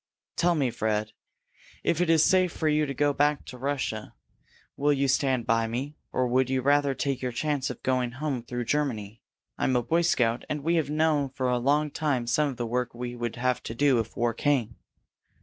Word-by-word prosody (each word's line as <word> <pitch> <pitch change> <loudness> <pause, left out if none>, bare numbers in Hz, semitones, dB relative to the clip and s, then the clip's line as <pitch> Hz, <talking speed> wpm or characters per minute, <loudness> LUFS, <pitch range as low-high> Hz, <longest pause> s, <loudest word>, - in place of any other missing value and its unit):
Tell 175 0 +2
me, 135 -6 +1
Fred. 110 -1 -1 0.7
If 170 - +1
it 180 - +1
is 160 -1 +5
safe 185 -2 +3
for 160 - -2
you 150 0 +2
to 140 - -3
go 145 +2 +2
back 145 +1 +2
into 125 - -11
Russia, 130 -5 -3 0.6
will 145 +1 +2
you 140 -1 +1
stand 130 -2 +1
by 115 -1 +2
me? 130 +6 -4 0.2
Or 130 - +1
would 130 +1 +2
you 130 -1 0
rather 140 0 +3
take 140 -1 -2
your 125 -1 -2
chance 145 +1 -1
of - - -8
going 125 -2 0
home 135 -1 -3
through 120 +1 -4
Germany? 115 -7 -2 0.4
I'm 130 - +1
a 120 - +2
Boy 165 +7 +2
Scout, 125 -9 +1
and 150 -1 -3
we 165 +3 +1
have 150 -4 0
known 150 -2 +1
for 130 -1 -2
a 125 - +1
long 145 +4 +1
time 140 -6 -1
some 145 +5 +1
of 130 - -7
the 120 - -2
work 125 +1 -2
we 120 0 -5
would 120 -1 -4
have 125 +1 0
to 115 - -6
do 135 -1 +3
if 110 -1 -5
war 120 0 +1
came." 120 -3 0
130 Hz, 215 wpm, -27 LUFS, 120-145 Hz, 0.7 s, is